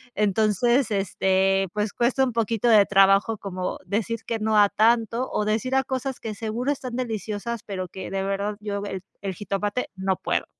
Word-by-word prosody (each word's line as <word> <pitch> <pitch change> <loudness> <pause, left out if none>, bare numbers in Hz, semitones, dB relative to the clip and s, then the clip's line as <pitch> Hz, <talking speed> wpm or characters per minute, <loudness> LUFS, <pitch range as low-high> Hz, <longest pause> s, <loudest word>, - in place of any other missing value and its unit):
entonces, 220 +4 +2
este, 195 0 +1
pues 210 0 -1
cuesta 250 +3 +2
un 250 -3 0
poquito 230 0 +1
de 210 -3 +7
trabajo, 195 +2 +4
como 185 -2 -4
decir 230 +2 -2
que 230 -1 -2
no 215 0 +1
a 205 -1 +6
tanto, 230 +2 +2
o 210 - 0
decir 225 +5 0
a 265 - +3
cosas 260 0 -3
que 215 -2 -5
seguro 230 +6 -2
están 255 -3 -4
deliciosas, 225 -1 -3
pero 185 -3 -4
que 190 -1 -7
de 195 0 -1
verdad 200 +1 -2
yo, 200 -1 -3 0.4
el 195 -1 -3
jitomate, 205 +4 -2
no 190 0 0
puedo. - - -1
215 Hz, 175 wpm, -24 LUFS, 195-235 Hz, 0.4 s, de